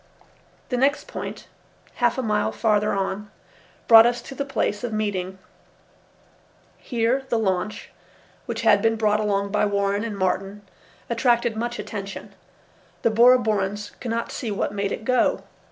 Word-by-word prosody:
The 250 Hz, -, -1 dB
next 275 Hz, +3 st, +1 dB
point, -, -, -7 dB, 0.6 s
half 240 Hz, 0 st, +3 dB
a 260 Hz, -, -1 dB
mile 210 Hz, -2 st, 0 dB
farther 210 Hz, -2 st, +1 dB
on, 200 Hz, +1 st, -2 dB, 0.6 s
brought 225 Hz, 0 st, +9 dB
us 240 Hz, 0 st, 0 dB
to -, -, -9 dB
the 280 Hz, -, -3 dB
place 245 Hz, -6 st, -2 dB
of 240 Hz, -, -3 dB
meeting. 195 Hz, -3 st, -2 dB, 1.4 s
Here 250 Hz, +2 st, -1 dB
the 235 Hz, -, +1 dB
launch, 200 Hz, -1 st, -2 dB, 0.6 s
which -, -, -3 dB
had 215 Hz, -3 st, +4 dB
been 225 Hz, +1 st, +2 dB
brought 215 Hz, -1 st, +1 dB
along 200 Hz, -1 st, 0 dB
by 210 Hz, 0 st, +2 dB
Warren 200 Hz, 0 st, 0 dB
and 220 Hz, -3 st, -4 dB
Martin, 195 Hz, +2 st, -2 dB, 0.4 s
attracted 235 Hz, -1 st, +1 dB
much 240 Hz, +2 st, -3 dB
attention. 200 Hz, -2 st, -7 dB, 0.7 s
The 230 Hz, -, +3 dB
Bora 240 Hz, +3 st, +6 dB
Borans 205 Hz, -2 st, -2 dB
could 245 Hz, -, -5 dB
not 230 Hz, +1 st, -2 dB
see 235 Hz, -, -4 dB
what 200 Hz, 0 st, -2 dB
made 200 Hz, -1 st, -2 dB
it 220 Hz, -, -5 dB
go. 255 Hz, 0 st, +2 dB
215 Hz, 155 wpm, -23 LUFS, 200-235 Hz, 1.4 s, brought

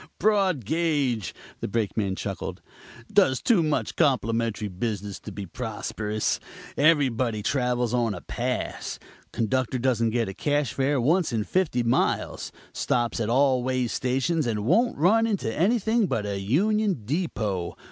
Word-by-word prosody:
"Broad 195 Hz, -, +2 dB
gauge," 145 Hz, -, 0 dB, 0.3 s
the -, -, -3 dB
Brakeman 105 Hz, -2 st, -1 dB
chuckled; 100 Hz, -1 st, -5 dB, 0.5 s
"does 130 Hz, -1 st, +4 dB
too 225 Hz, -8 st, +3 dB
much 155 Hz, -2 st, -1 dB
complimentary 115 Hz, -5 st, +1 dB
business 100 Hz, 0 st, -4 dB
to 105 Hz, -, -9 dB
be 100 Hz, 0 st, -6 dB
prosperous. 110 Hz, 0 st, -2 dB, 0.4 s
Everybody 130 Hz, -8 st, +2 dB
travels 125 Hz, -1 st, 0 dB
on 115 Hz, -4 st, +1 dB
a 90 Hz, -, -8 dB
pass. -, -, -3 dB, 0.3 s
Conductor 130 Hz, +2 st, 0 dB
doesn't 120 Hz, -2 st, +1 dB
get 115 Hz, 0 st, 0 dB
a 95 Hz, -, -5 dB
cash 145 Hz, +5 st, 0 dB
fare 135 Hz, +1 st, +1 dB
once 160 Hz, +7 st, +2 dB
in 110 Hz, -2 st, 0 dB
fifty 150 Hz, -, 0 dB
miles. 120 Hz, +3 st, 0 dB, 0.2 s
Stops 120 Hz, -1 st, 0 dB
at 110 Hz, -1 st, -1 dB
all 130 Hz, +1 st, +3 dB
way 130 Hz, 0 st, 0 dB
stations 130 Hz, +6 st, 0 dB
and 105 Hz, -3 st, -1 dB
won't 235 Hz, -, +3 dB
run 215 Hz, +9 st, +4 dB
into 195 Hz, -, -1 dB
anything 220 Hz, +4 st, +2 dB
but 105 Hz, -9 st, -1 dB
a 100 Hz, -1 st, -2 dB
union 190 Hz, -, +1 dB
depot. 110 Hz, -, -2 dB
125 Hz, 140 wpm, -26 LUFS, 110-155 Hz, 0.5 s, does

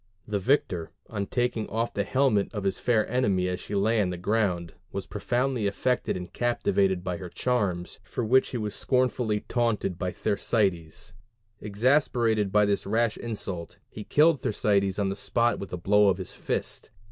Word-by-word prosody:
The 105 Hz, -1 st, -1 dB
victor, 90 Hz, -, +1 dB, 0.2 s
on 100 Hz, -1 st, -2 dB
taking 120 Hz, -3 st, -1 dB
off 115 Hz, +2 st, -1 dB
the 100 Hz, -, 0 dB
helmet 125 Hz, -2 st, +2 dB
of 105 Hz, -, -3 dB
his 95 Hz, -1 st, -1 dB
fair 115 Hz, -3 st, +2 dB
enemy 100 Hz, -7 st, +1 dB
as 90 Hz, 0 st, -2 dB
she 105 Hz, -, -5 dB
lay 110 Hz, +3 st, +2 dB
on 95 Hz, -, 0 dB
the 90 Hz, -, -4 dB
ground, 90 Hz, -3 st, 0 dB, 0.2 s
was -, -, -4 dB
profoundly 125 Hz, -3 st, -1 dB
affected 125 Hz, +2 st, 0 dB
and 90 Hz, -1 st, -8 dB
captivated 100 Hz, -6 st, +1 dB
by 90 Hz, -2 st, -2 dB
her 90 Hz, -1 st, -7 dB
charms, 100 Hz, -7 st, -1 dB
for 120 Hz, -, -3 dB
which 130 Hz, +4 st, +4 dB
he 125 Hz, -, -3 dB
was 105 Hz, -2 st, -3 dB
scornfully 125 Hz, -5 st, +1 dB
taunted 115 Hz, -7 st, -1 dB
by 90 Hz, -2 st, -1 dB
Thersites; 100 Hz, -2 st, -1 dB, 0.5 s
exasperated 110 Hz, -1 st, +2 dB
by 105 Hz, 0 st, +4 dB
this 100 Hz, -1 st, 0 dB
rash 110 Hz, +1 st, +1 dB
insult, 95 Hz, -7 st, -6 dB
he 105 Hz, -, -7 dB
killed 150 Hz, +5 st, +4 dB
Thersites 100 Hz, -2 st, +1 dB
on 100 Hz, -2 st, +1 dB
the 95 Hz, -, -2 dB
spot 120 Hz, +4 st, +1 dB
with 100 Hz, -, -7 dB
a 90 Hz, -, -3 dB
blow 105 Hz, +3 st, +4 dB
of 95 Hz, -, +1 dB
his 95 Hz, -, -6 dB
fist. -, -, -3 dB
105 Hz, 175 wpm, -27 LUFS, 95-120 Hz, 0.5 s, which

